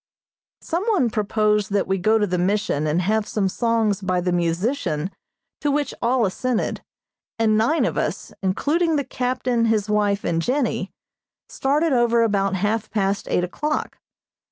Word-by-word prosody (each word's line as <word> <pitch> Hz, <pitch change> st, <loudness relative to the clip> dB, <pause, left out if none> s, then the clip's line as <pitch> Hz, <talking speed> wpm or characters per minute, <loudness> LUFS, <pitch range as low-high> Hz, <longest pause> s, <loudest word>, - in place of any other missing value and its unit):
Some 340 Hz, +3 st, -2 dB
one 370 Hz, -, +2 dB
proposed 210 Hz, -1 st, +1 dB
that 200 Hz, -, +2 dB
we 190 Hz, 0 st, 0 dB
go 215 Hz, +4 st, +3 dB
to 210 Hz, -, +2 dB
the 180 Hz, -2 st, -1 dB
Mission 190 Hz, -5 st, 0 dB
and 165 Hz, +4 st, +1 dB
have 215 Hz, +3 st, +1 dB
some 200 Hz, -3 st, 0 dB
songs 225 Hz, -1 st, 0 dB
by 185 Hz, -1 st, 0 dB
the 180 Hz, 0 st, -1 dB
musician, 175 Hz, -, -1 dB, 0.5 s
to 295 Hz, -, 0 dB
which 290 Hz, 0 st, 0 dB
all 240 Hz, 0 st, +2 dB
assented, 240 Hz, +5 st, -1 dB, 0.6 s
and 220 Hz, -1 st, +3 dB
nine 235 Hz, +10 st, +2 dB
of -, -, -1 dB
us, -, -, -3 dB
including 310 Hz, -, +1 dB
the 285 Hz, -, +1 dB
captain, 250 Hz, -2 st, -1 dB
his 215 Hz, -2 st, +1 dB
wife 205 Hz, -1 st, +1 dB
and 165 Hz, -1 st, 0 dB
Jennie, 245 Hz, -, -1 dB, 0.6 s
started 295 Hz, +3 st, +1 dB
over 235 Hz, -1 st, +3 dB
about 195 Hz, -3 st, +1 dB
half 210 Hz, +3 st, -1 dB
past 200 Hz, -2 st, -1 dB
eight 180 Hz, -, +1 dB
o'clock. 300 Hz, +12 st, -3 dB
215 Hz, 155 wpm, -22 LUFS, 195-250 Hz, 0.6 s, go